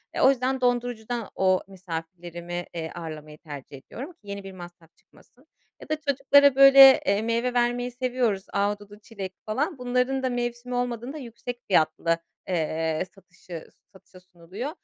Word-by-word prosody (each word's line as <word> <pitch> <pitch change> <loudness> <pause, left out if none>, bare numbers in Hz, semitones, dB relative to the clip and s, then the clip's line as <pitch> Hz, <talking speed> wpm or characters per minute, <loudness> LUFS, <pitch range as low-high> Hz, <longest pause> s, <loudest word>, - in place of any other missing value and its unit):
Eee, - - -1
o - - +7
yüzden 260 0 0
dondurucudan 245 -2 -1
o 185 -1 +3
misafirlerimi, 175 -1 -6
eee, 160 -1 -4
ağırlamayı 155 -3 -8
tercih 145 -3 -10
ediyorum 265 - -9
ki - - -43
yeni 200 0 -6
bir 195 - -8
masraf 175 -2 -13
çıkmasın. 260 +6 -24 0.3
Ya - - -12
da 310 - +2
çocuklara 280 0 +5
böyle, 275 +1 +9
eee, 200 -4 +2
meyve 235 +2 0
vermeyi 245 0 +1
seviyoruz. 245 -5 -1
Ahududu, 205 +1 -2
çilek 200 -4 -7
falan. 285 - -1
Bunların 250 +1 0
da 260 - +1
mevsimi 245 0 -3
olmadığında, 245 +3 -3
yüksek 245 -2 -7
fiyatlı, 165 -1 +2 0.3
eee, 160 -2 -1
satışı 180 -3 -11 0.3
satışa 190 -1 -17
sunuluyor. 180 - -8
215 Hz, 145 wpm, -26 LUFS, 175-250 Hz, 0.3 s, böyle